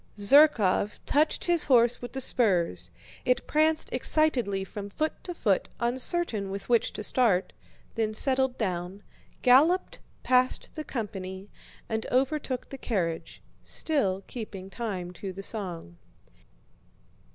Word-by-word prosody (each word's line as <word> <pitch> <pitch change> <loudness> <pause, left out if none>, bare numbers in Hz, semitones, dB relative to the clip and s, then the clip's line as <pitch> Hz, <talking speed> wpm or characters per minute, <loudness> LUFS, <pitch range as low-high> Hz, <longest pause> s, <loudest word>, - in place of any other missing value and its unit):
Zherkóv 210 -4 +4
touched 300 +2 +1
his 345 -2 +2
horse 240 -3 +4
with 245 - -7
the 265 - -2
spurs; 175 - +2 0.3
it 250 +1 +1
pranced 310 +1 +1
excitedly 245 -11 +1
from 200 +2 -7
foot 310 +9 -3
to 355 - -5
foot 200 - 0
uncertain 240 - -1
with 195 0 -6
which 235 -2 +2
to - - -6
start, 210 -6 +1 0.4
then 220 -2 -1
settled 265 +1 +1
down, 185 -1 -3 0.4
galloped 305 +9 +4 0.2
past 255 0 +2
the 310 - -5
company, 195 -6 -6 0.4
and 220 0 -3
overtook 265 0 -1
the 275 - -8
carriage, 175 -10 -3 0.2
still 195 -12 -1
keeping 195 -5 -8
time 195 -7 -4
to 190 +2 -6
the 195 +1 -8
song. 175 - -6
225 Hz, 125 wpm, -27 LUFS, 195-265 Hz, 0.4 s, Zherkóv